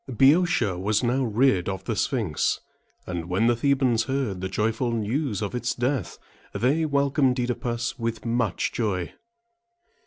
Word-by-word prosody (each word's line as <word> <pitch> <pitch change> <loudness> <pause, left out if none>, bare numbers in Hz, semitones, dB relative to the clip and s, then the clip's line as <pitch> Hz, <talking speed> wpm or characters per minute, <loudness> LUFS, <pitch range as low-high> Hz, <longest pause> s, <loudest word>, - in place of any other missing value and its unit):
Boeotia 135 - +3
was 105 +4 +1
now 125 +3 +1
rid 110 -5 +2
of 95 -1 -4
the 115 - -2
Sphinx; 105 - 0 0.5
and 85 -1 -5
when 95 +5 +1
the 120 - +4
The´bans 125 -2 +2
heard 125 -8 -2
the 95 - -3
joyful 110 +5 0
news 115 0 -1
of 100 - -3
its 125 0 -2
death, 125 - -1 0.4
they 145 +6 +1
welcomed 140 -2 +2
OEdipus 120 0 -2
with 115 0 -3
much 115 -5 0
joy. 95 -6 -2
120 Hz, 145 wpm, -25 LUFS, 105-130 Hz, 0.5 s, the